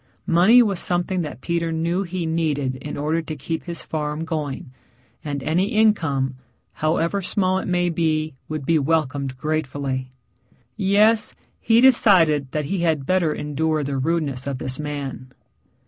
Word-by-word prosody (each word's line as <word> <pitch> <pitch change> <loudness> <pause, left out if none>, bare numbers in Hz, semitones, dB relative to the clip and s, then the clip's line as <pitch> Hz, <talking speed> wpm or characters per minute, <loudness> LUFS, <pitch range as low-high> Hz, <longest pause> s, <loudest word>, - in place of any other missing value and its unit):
Money 195 +9 +6
was 200 -5 -1
something 180 +1 0
that 145 -7 -6
Peter 170 +1 -1
knew 170 +3 0
he 185 -2 -3
needed 150 -5 -1
in 145 +3 -7
order 155 +3 0
to 160 -1 -6
keep 160 +2 -4
his 170 -2 -5
farm 150 0 -3
going, 150 -3 -4 0.5
and 145 -2 -4
any 180 +5 +1
income, 160 -12 +2 0.4
however 165 +5 0
small 185 0 +1
it - - -5
may 175 -1 +1
be, 160 -2 0
would 155 -3 -4
be 160 +2 +3
welcomed 140 -3 -1
gratefully. 135 -3 -3 0.6
Yes, 215 +2 +3 0.2
he 225 0 +3
decided 170 - +5
that 150 0 -2
he 190 +6 -2
had 160 -5 0
better 185 -2 +2
endure 150 +1 -1
the 140 0 -3
rudeness 140 -3 -1
of 140 -2 -2
this 130 +1 -4
man. 140 -3 -5
160 Hz, 150 wpm, -22 LUFS, 145-175 Hz, 0.6 s, Money